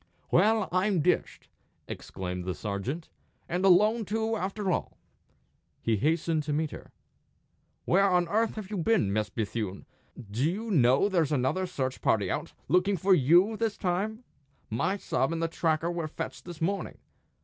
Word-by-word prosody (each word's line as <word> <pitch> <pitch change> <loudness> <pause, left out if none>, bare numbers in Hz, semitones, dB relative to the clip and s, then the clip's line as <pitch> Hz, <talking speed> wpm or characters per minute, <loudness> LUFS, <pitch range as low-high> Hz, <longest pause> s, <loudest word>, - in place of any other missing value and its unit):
"Well, 215 +2 +4
I'm 185 -1 +2
dished!" - - 0 0.4
exclaimed 90 -1 -5
the 90 - -2
sergeant. 115 - -4 0.4
"And 180 +2 -2
alone, 210 +5 +5
too, 220 +2 -1
after 195 -1 -2
all!" - - -2 0.8
He 115 -2 0
hastened 160 +4 +1
to 150 0 -3
meet 155 0 -1
her. - - -10 0.9
"Where 195 +3 +4
on 180 -1 +2
earth 220 +5 +1
have 215 -2 -7
you 210 - -2
been, 175 - +2
Miss 110 0 0
Bethune? 105 -3 -4 0.5
Do 125 +9 +1
you 215 +5 -4
know 135 +1 +4
there's 170 -7 +1
another 150 +7 0
search 130 -7 -3
party 100 -4 +1
out, - - -3 0.2
looking 185 +2 +2
for 190 +4 +3
you 175 - +5
this 225 -2 -1
time? 210 +6 -2 0.5
My 185 - 0
sub 135 -6 -1
and 165 - -2
the 165 - +1
tracker 165 0 0
were 170 -2 -3
fetched 155 - -6
this 175 -2 -9
morning. 195 +4 -2
175 Hz, 160 wpm, -28 LUFS, 135-200 Hz, 0.9 s, alone